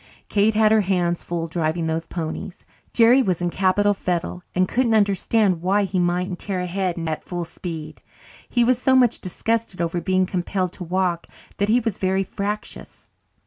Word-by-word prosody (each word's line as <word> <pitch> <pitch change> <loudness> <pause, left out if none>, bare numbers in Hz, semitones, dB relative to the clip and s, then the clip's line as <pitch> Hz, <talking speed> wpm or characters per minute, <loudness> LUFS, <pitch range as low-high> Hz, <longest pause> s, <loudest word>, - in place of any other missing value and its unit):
Kate 210 +1 +2
had 215 0 +4
her 220 -1 +5
hands 175 -3 0
full 170 -1 -3
driving 165 0 -1
those 160 +1 -2
ponies. 170 +2 -6 0.3
Jerry 240 +3 +5
was 185 -8 0
in 175 -1 -1
capital 200 +3 +2
fettle 180 -2 -3
and 185 0 +3
couldn't 235 0 +1
understand 200 -2 +2
why 195 +3 +2
he 190 -1 -1
mightn't 180 +1 0
tear 195 -3 -3
ahead 180 0 -2
at 155 -1 -3
full 175 -1 -4
speed. 160 -2 -7 0.5
He 240 - +2
was 245 +1 +2
so 260 0 +4
much 245 -3 +3
disgusted 225 +1 -2
over 170 0 -1
being 185 +2 +2
compelled 185 0 -2
to 180 - -7
walk 180 -1 -1 0.3
that 200 +1 0
he 235 +3 +4
was 225 -4 -3
very 190 0 +1
fractious. 205 +2 -6
185 Hz, 175 wpm, -22 LUFS, 175-210 Hz, 0.5 s, her